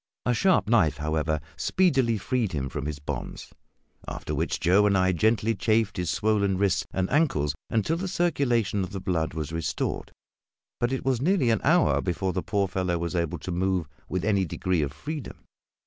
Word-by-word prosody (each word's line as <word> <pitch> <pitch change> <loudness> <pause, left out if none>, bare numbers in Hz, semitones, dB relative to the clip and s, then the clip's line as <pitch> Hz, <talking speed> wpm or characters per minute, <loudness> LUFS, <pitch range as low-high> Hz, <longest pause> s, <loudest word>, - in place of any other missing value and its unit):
A 125 - +2
sharp 185 - +3
knife, 105 -10 +3
however, 75 0 -1 0.2
speedily 135 -11 +2
freed 115 -1 -1
him 65 -3 -2
from 75 +2 -4
his 75 -2 -4
bonds, 75 - -6 0.5
after - - -5
which - - -1
Joe 100 +4 +4
and 100 -1 +3
I 95 0 +3
gently 110 +5 +2
chafed 110 0 +1
his 90 -2 -1
swollen 100 -2 +1
wrists 100 -2 +1
and 95 -1 0
ankles 130 - +2 0.2
until 115 +9 +1
the 190 +3 -3
circulation 125 - +1
of 95 - -6
the 95 - -3
blood 85 -4 -1
was 80 0 -4
restored; 80 -1 -2 0.7
but 120 +1 +1
it 130 0 -3
was 130 -3 +1
nearly 155 -6 +3
an 110 - +1
hour 170 +4 +4
before 95 +1 -1
the 90 - -1
poor 100 0 0
fellow 90 -1 -1
was 85 +1 -3
able 85 0 -1
to 90 - -6
move 90 -2 0 0.2
with 95 0 -2
any 100 -3 +2
degree 90 0 -1
of 70 -2 -1
freedom. 145 - -7
95 Hz, 185 wpm, -26 LUFS, 85-120 Hz, 0.7 s, Joe